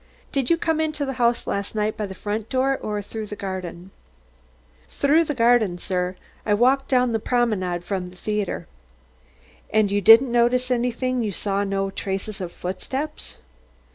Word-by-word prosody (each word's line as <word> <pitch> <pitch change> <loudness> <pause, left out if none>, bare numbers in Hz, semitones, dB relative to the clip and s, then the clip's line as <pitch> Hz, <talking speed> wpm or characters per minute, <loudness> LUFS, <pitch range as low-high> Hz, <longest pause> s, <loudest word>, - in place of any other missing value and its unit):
"Did 270 -3 0
you 335 - +4
come 320 -1 0
into 305 -2 -1
the 270 - -3
house 235 0 +2
last 200 +2 -3
night 215 0 0
by 210 - -3
the 190 - -8
front 210 +3 -4
door, 265 +1 +2
or 210 -1 -3
through 220 +1 -6
the 210 - -6
garden?" 185 -2 -6 1.0
"Through 305 +4 +3
the 295 - -2
garden, 230 -6 +3
sir. 180 0 -2 0.3
I 210 - +2
walked 260 +5 +3
down 250 -2 +3
the 225 - 0
Promenade 210 -8 0
from 185 -1 -3
the 180 - -15
theatre." 210 +1 -2 1.0
"And 215 -2 +2
you 205 0 +1
didn't 230 +6 +8
notice 245 +2 +2
anything 250 +1 0
you 215 -3 -1
saw 200 +1 0
no 195 -1 -1
traces 195 +1 -4
of 175 -2 -4
footsteps?" 265 - -4
215 Hz, 170 wpm, -23 LUFS, 195-250 Hz, 1.0 s, didn't